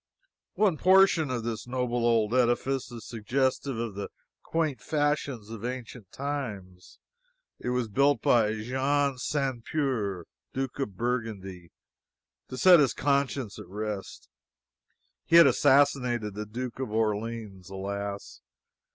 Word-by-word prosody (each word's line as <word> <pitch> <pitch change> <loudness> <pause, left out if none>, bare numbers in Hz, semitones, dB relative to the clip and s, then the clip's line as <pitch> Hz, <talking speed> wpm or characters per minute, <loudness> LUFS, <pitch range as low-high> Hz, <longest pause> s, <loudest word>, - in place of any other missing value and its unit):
One 200 -7 +2
portion 185 -4 +5
of 125 -3 -2
this 115 0 -4
noble 125 -1 -1
old 115 -1 +2
edifice 125 +2 +1
is 115 -2 -9
suggestive 130 +3 -1
of 115 -2 -3
the 100 +1 -5 0.3
quaint 160 -5 -1
fashions 145 -7 -1
of 115 -2 -8
ancient 125 -5 -6
times. 105 -11 -6 0.6
It - - -4
was 125 -1 0
built 140 +7 +3
by 110 -3 +3
Jean 130 +4 0
Sans 135 -2 -1
Peur, 110 - -1 0.3
Duke 135 0 -3
of 105 -9 -3
Burgundy, 105 -7 -3 0.8
to 130 - -7
set 180 +3 +7
his 140 -5 +2
conscience 140 -5 0
at - - -10
rest 105 -7 -6 1.0
he 165 - +1
had 170 -1 +10
assassinated 130 -5 +3
the 105 +1 -6
Duke 125 +3 -6
of 130 - -3
Orleans. 110 -3 -2
Alas! 100 +1 -5
120 Hz, 125 wpm, -28 LUFS, 105-140 Hz, 1.0 s, had